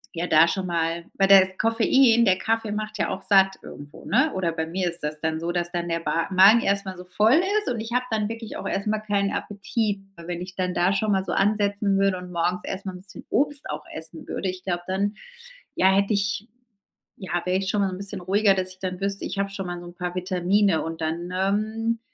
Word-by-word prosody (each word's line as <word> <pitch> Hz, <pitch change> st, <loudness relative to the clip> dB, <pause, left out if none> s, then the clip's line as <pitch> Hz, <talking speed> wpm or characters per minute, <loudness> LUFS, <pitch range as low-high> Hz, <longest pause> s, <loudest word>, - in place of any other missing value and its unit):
ja 170 Hz, +1 st, -2 dB
da 160 Hz, +1 st, +6 dB
schon 185 Hz, +1 st, -2 dB
mal 170 Hz, 0 st, -1 dB
weil 195 Hz, -, +3 dB
das 190 Hz, -1 st, +6 dB
Koffein 230 Hz, +1 st, +4 dB
der 185 Hz, -4 st, +4 dB
Kaffee 225 Hz, 0 st, -1 dB
macht 215 Hz, -1 st, -4 dB
ja -, -, +1 dB
auch 190 Hz, -, -5 dB
satt 195 Hz, -1 st, +4 dB
irgendwo, 145 Hz, +1 st, -11 dB
ne? 265 Hz, +6 st, +2 dB
Oder 180 Hz, -3 st, 0 dB
bei 160 Hz, -1 st, -2 dB
mir 180 Hz, +1 st, -1 dB
ist 170 Hz, +1 st, -9 dB
das 150 Hz, 0 st, -3 dB
dann 160 Hz, 0 st, -1 dB
so, 170 Hz, +1 st, -2 dB
dass 175 Hz, 0 st, -2 dB
dann 175 Hz, -1 st, -3 dB
der 165 Hz, 0 st, 0 dB
Ba 165 Hz, 0 st, -1 dB
Magen 200 Hz, +5 st, +7 dB
erst 200 Hz, 0 st, 0 dB
mal 190 Hz, -1 st, -5 dB
so 180 Hz, -, -9 dB
voll 215 Hz, -, +3 dB, 0.2 s
ist 420 Hz, -, -5 dB
und 230 Hz, -, -4 dB
ich 225 Hz, -, -7 dB
habe 250 Hz, 0 st, +1 dB
dann 215 Hz, -1 st, 0 dB
wirklich 225 Hz, -1 st, -7 dB
auch -, -, -5 dB
erst 195 Hz, -, -2 dB
mal 215 Hz, 0 st, +1 dB
keinen 205 Hz, -2 st, 0 dB
Appetit. 205 Hz, 0 st, -2 dB, 0.2 s
Weil 170 Hz, -1 st, -12 dB
wenn 175 Hz, -1 st, -4 dB
ich 180 Hz, +1 st, -8 dB
dann 180 Hz, -1 st, -1 dB
da 180 Hz, +3 st, +3 dB
schon 215 Hz, +1 st, 0 dB
mal 190 Hz, -1 st, +1 dB
so -, -, -4 dB
ansetzen 205 Hz, -1 st, +1 dB
würde 195 Hz, -1 st, +2 dB
und 180 Hz, 0 st, -9 dB
morgens 175 Hz, +1 st, 0 dB
erst 195 Hz, +1 st, -5 dB
mal 190 Hz, -, -3 dB
'n 180 Hz, -, -10 dB
bisschen 190 Hz, 0 st, -13 dB
Obst 290 Hz, 0 st, 0 dB
auch -, -, -4 dB
essen 160 Hz, +1 st, -8 dB
würde, 190 Hz, -, -3 dB
ich 185 Hz, 0 st, -7 dB
glaube 175 Hz, -2 st, -2 dB
dann, 200 Hz, +2 st, -1 dB, 0.6 s
ja, 190 Hz, -, +4 dB
hätte 200 Hz, +2 st, +2 dB
ich 200 Hz, +2 st, -1 dB, 0.7 s
ja, 175 Hz, -2 st, -3 dB
wäre 180 Hz, +1 st, +1 dB
ich 190 Hz, -1 st, -3 dB
schon 205 Hz, 0 st, +1 dB
mal 195 Hz, -, +2 dB
so 185 Hz, -, -5 dB
'n -, -, -8 dB
bisschen 200 Hz, -1 st, -5 dB
ruhiger, 200 Hz, +2 st, +3 dB
dass 185 Hz, -1 st, -2 dB
ich 185 Hz, -, -17 dB
dann 185 Hz, -1 st, -4 dB
wüsste: 195 Hz, 0 st, -2 dB
„Ich -, -, -4 dB
habe 200 Hz, 0 st, 0 dB
schon 195 Hz, -2 st, -5 dB
mal 175 Hz, 0 st, -5 dB
so 175 Hz, -, -10 dB
'n 175 Hz, -, -12 dB
paar 180 Hz, 0 st, -4 dB
Vitamine.“ 185 Hz, 0 st, +1 dB
Und 165 Hz, 0 st, -5 dB
dann, 170 Hz, +3 st, -3 dB
ähm, 215 Hz, +4 st, -1 dB
190 Hz, 250 wpm, -24 LUFS, 175-205 Hz, 0.7 s, Magen